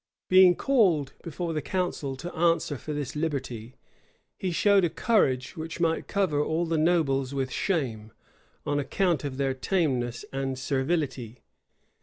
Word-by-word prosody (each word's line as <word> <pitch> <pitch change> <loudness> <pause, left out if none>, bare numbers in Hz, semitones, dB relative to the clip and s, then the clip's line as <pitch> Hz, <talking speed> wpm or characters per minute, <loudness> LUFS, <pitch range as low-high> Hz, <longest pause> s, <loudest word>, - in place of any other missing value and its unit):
Being 185 -1 +7
called 180 - +2
before 170 0 -4
the 155 - -1
council 175 -6 -2
to 175 +6 -7
answer 165 -2 +2
for 155 - -6
this 145 -2 -4
liberty, 130 -7 -3 0.6
he 190 - -3
showed 200 +3 +4
a 175 - +2
courage 135 - +1
which 160 +1 -6
might 165 -1 0
cover 175 -8 +1
all 160 +3 0
the 165 -1 0
nobles 140 -5 +1
with 135 -1 -2
shame, 120 - -2 0.5
on 145 0 0
account 170 +2 0
of 135 -2 -4
their 135 -1 0
tameness 130 -6 -1
and 135 -1 -2
servility. 130 -3 -2
150 Hz, 145 wpm, -27 LUFS, 130-175 Hz, 0.6 s, Being